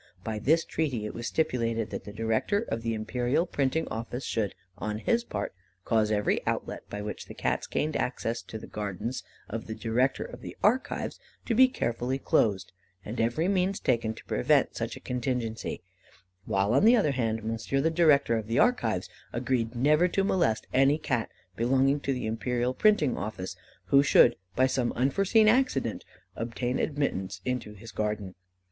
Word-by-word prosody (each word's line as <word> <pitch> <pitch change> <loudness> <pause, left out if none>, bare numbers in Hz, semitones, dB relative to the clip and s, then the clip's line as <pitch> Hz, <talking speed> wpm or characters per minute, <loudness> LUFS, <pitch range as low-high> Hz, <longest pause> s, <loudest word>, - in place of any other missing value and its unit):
By 110 -1 -3
this 160 +9 +3
treaty 130 -9 -1
it 105 - -5
was 115 0 -4
stipulated 115 -7 0
that - - -5
the 105 - -7
Director 115 - 0
of 115 - -3
the 115 0 -1
Imperial 120 +8 0
Printing 145 -1 0
Office 115 +3 -4
should, 110 -4 -1 0.2
on 105 0 -2
his 230 - +1
part, - - -4 0.3
cause 110 -2 +2
every 105 -1 +1
outlet - - -3
by 105 0 -5
which 105 - -6
the - - -9
Cats - - -1
gained 155 +1 -1
access 115 -1 -1
to 110 - -8
the - - -9
gardens 105 +4 -4 0.3
of 110 +1 -5
the 110 - -4
Director 125 +4 +1
of 125 - -10
the - - -8
Archives 245 +5 +1 0.3
to 235 - 0
be 260 +3 +7
carefully 125 - -2
closed, 105 -7 +1 0.3
and 115 +3 -3
every 120 +9 +1
means 190 0 +1
taken 115 -3 0
to - - -13
prevent - - +2
such - - -3
a - - -13
contingency; 125 -6 -3 0.6
while, 100 +3 +1
on 135 - +4
the 230 +3 +7
other 200 -11 +3
hand, 115 -4 -1
Monsieur, 115 +5 -1
the 160 +4 +2
Director 150 -7 +4
of 110 -1 -4
the 115 +2 -1
Archives, 115 - +2 0.2
agreed 120 -1 -1
never 150 +8 +4
to 195 +2 0
molest 170 - +1
any 135 +3 +4
Cat 130 -7 -1 0.3
belonging 135 +5 +2
to 140 - -2
the 125 -3 -2
Imperial 120 +3 -1
Printing 180 - +3
Office, 95 -3 -5 0.4
who 140 - +8
should, 120 -3 +6 0.2
by 130 - +4
some 130 -2 0
unforeseen 195 - +3
accident, 245 - +2 0.3
obtain 120 +2 -2
admittance 95 - -1
into 125 -4 -3
his 115 +3 -11
garden. 105 -3 -2
120 Hz, 175 wpm, -28 LUFS, 110-145 Hz, 0.6 s, who